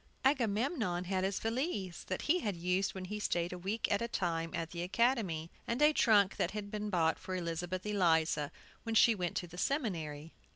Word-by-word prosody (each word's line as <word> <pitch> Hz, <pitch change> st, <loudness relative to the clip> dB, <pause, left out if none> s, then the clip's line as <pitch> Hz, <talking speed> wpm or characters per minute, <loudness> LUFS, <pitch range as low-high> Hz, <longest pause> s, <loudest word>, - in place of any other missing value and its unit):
Agamemnon 230 Hz, -, +1 dB
had 185 Hz, 0 st, -1 dB
his 195 Hz, 0 st, 0 dB
valise, 225 Hz, -, -2 dB
that 185 Hz, -, -3 dB
he 350 Hz, +4 st, +3 dB
had 205 Hz, -, -2 dB
used 180 Hz, +3 st, 0 dB
when 185 Hz, -1 st, -5 dB
he 210 Hz, +3 st, -4 dB
stayed 175 Hz, -3 st, 0 dB
a -, -, -5 dB
week 200 Hz, +5 st, -1 dB
at 205 Hz, -, +2 dB
a 235 Hz, -, 0 dB
time 165 Hz, -6 st, -1 dB
at 165 Hz, -1 st, -3 dB
the 170 Hz, -, -4 dB
academy; 185 Hz, -5 st, +1 dB, 0.2 s
and 235 Hz, +2 st, -1 dB
a 300 Hz, +1 st, +6 dB
trunk 205 Hz, -8 st, +4 dB
had 205 Hz, -1 st, -2 dB
been 210 Hz, 0 st, -3 dB
bought 165 Hz, -4 st, +2 dB
for 185 Hz, -, -5 dB
Elizabeth 175 Hz, +2 st, -3 dB
Eliza 160 Hz, -7 st, +2 dB, 0.3 s
when 225 Hz, -1 st, -3 dB
she 230 Hz, +1 st, +7 dB
went 180 Hz, -4 st, -2 dB
to -, -, -2 dB
the 175 Hz, +1 st, -10 dB
seminary. 165 Hz, -, -2 dB
190 Hz, 195 wpm, -33 LUFS, 175-225 Hz, 0.3 s, she